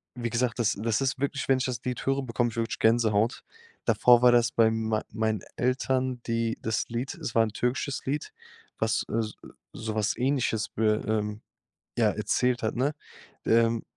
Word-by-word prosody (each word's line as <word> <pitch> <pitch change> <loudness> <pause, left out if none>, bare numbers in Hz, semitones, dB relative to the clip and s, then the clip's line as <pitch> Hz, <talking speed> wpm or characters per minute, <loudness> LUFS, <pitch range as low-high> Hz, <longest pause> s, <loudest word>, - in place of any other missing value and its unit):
wie 120 -1 -3
gesagt, 120 0 0
das 105 -4 +1
das 115 +3 0
ist 135 0 0
wirklich 140 0 -2
wenn 135 - +5
ich - - -1
das 125 -2 -3
Lied 125 -1 -3
höre, 135 0 +1
bekomme 120 -1 0
ich 120 - -11
wirklich 115 -1 -2
Gänsehaut. 110 -1 +2 0.4
Davor 120 -1 +5
war 125 - +8
das 120 0 +3
bei 110 -1 +4
mei 110 -1 -1
meinen 110 -2 -1 0.2
Eltern 130 0 0
die 115 0 0
das 110 0 -1
Lied 120 +3 -3
es 115 - -5
war 115 - +6
'n 110 - -5
türkisches 130 +3 -2
Lied, 145 +2 -3 0.5
was - - +1
so 115 - 0 0.5
sowas 110 -2 -2
Ähnliches 125 -4 0
wür 110 -1 +1
ähm, 105 -1 -1 0.6
ja, - - +4
erzählt 125 -1 0
hat, 110 - -1
ne? 135 +5 +1 0.5
Ähm. 115 0 +3
115 Hz, 175 wpm, -27 LUFS, 110-125 Hz, 0.6 s, war